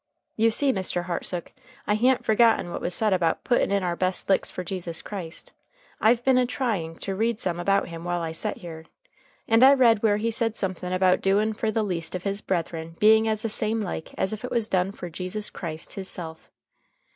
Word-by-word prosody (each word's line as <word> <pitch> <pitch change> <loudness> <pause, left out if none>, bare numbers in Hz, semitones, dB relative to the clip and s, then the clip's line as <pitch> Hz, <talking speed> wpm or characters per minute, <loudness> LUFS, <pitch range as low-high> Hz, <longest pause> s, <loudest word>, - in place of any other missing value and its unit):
"You 225 +1 +3
see, 270 +4 +4
Mr. 185 -2 0
Hartsook, 175 0 -3 0.3
I 210 - +1
ha'n't 250 +4 +2
forgot 225 -2 +4
what 175 - -6
was 175 - 0
said 215 -3 +2
about 170 -3 0
puttin' 240 - +2
in 200 -1 +1
our 175 -1 -1
best 185 +2 -2
licks 195 - +2
for 180 - -5
Jesus 175 -2 -4
Christ. 180 -6 -7 0.5
I've 235 +2 +3
been 260 -1 +5
a 250 - +2
trying 210 -11 -2
to 195 - -5
read 225 +3 0
some 175 -2 -2
about 195 +3 +1
him 165 0 -8
while 175 0 -1
I 165 -1 -3
set 160 - -3
here. 160 -2 -9 0.6
And 225 +2 +5
I 275 +2 +8
read 230 -5 +4
where 210 -2 +3
he 230 +2 -1
said 225 0 -1
somethin 185 -1 -3
about 185 0 +3
doing 210 +3 +2
fer 220 +1 -2
the 215 0 0
least 175 -4 -3
of 180 - -5
his 200 +1 -2
brethren 165 -3 -3
being 220 +1 +5
as 215 0 +1
the 225 - -1
same 215 +1 0
like 175 -4 -6
as 190 - -1
if 215 - -7
it 250 - -4
was 230 -3 -1
done 185 -1 +1
fer 175 -3 -8
Jesus 185 +5 -5
Christ 160 -3 -6
his 195 -1 -5
self. 160 -2 -7
195 Hz, 215 wpm, -25 LUFS, 175-220 Hz, 0.6 s, I